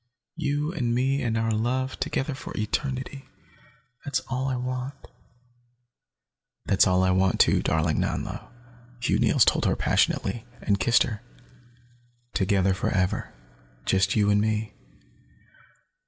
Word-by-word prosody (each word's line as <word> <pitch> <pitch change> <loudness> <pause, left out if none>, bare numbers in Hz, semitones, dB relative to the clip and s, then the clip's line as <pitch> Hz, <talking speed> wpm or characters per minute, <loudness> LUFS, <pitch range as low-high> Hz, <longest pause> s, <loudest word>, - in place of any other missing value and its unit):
You 150 0 -1
and 120 -8 -1
me, 135 +3 +1
and 115 -2 0
our 115 0 0
love, 125 +4 -1
together 140 +2 -2
for 130 - -8
eternity. 130 +4 -3 0.7
That's 145 -3 -1
all 130 +1 -1
I 130 - -1
want." 125 +2 -4 1.7
"That's 95 - +4
all 90 0 +3
I 95 - +3
want, 95 0 +2
too, - - +4
darling 80 0 +1
Nanlo," - - -3 0.5
Hugh 120 - +1
Neils - - +4
told - - +2
her - - +2
passionately, 110 +4 +1 0.2
and 100 -2 0
kissed 115 +5 +4
her. 110 -3 -5 1.1
"Together, 95 -1 +2
forever. 95 0 -1 0.5
Just 95 0 +2
you 105 -2 +3
and 105 0 +3
me." 110 0 -1
115 Hz, 125 wpm, -26 LUFS, 100-130 Hz, 1.7 s, That's